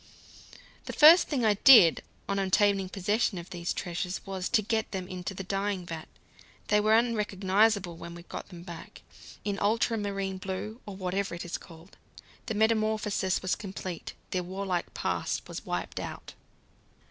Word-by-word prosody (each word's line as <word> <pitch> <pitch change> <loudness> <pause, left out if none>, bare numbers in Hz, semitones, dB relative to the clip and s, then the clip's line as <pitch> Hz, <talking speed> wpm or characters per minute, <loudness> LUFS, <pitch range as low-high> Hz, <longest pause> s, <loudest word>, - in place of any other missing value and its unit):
The - - -5
first 320 +4 +8
thing 260 -6 0
I 215 - +5
did, 205 - +7 0.3
on 200 0 0
obtaining 195 0 +2
possession 205 +2 0
of 175 +2 -8
these 175 -1 -3
treasures, 180 +1 -3
was 190 -1 -3
to 215 - +3
get 220 +1 -1
them 185 -2 -4
into 185 +2 -6
the 195 - -5
dyeing 195 -1 -2
vat. 165 -2 -7 0.6
They 210 - +4
were 215 +1 +4
unrecognizable 205 -4 +1
when 170 +1 -9
I 170 - -11
got - - -8
them 175 -3 -10
back 170 -2 -10 0.4
in 200 -1 -2
ultramarine 205 -3 0
blue, 195 +5 -5
or 200 - -6
whatever 190 0 -2
it 170 - -6
was 175 - -4
called. 165 +1 -15 0.5
The 220 - -2
metamorphosis 215 -3 +1
was 185 - +1
complete: 190 -4 -6 0.2
their 185 - 0
warlike 185 0 -3
past - - -2
was - - -8
wiped - - -3
out. - - -7
195 Hz, 160 wpm, -29 LUFS, 180-210 Hz, 0.6 s, first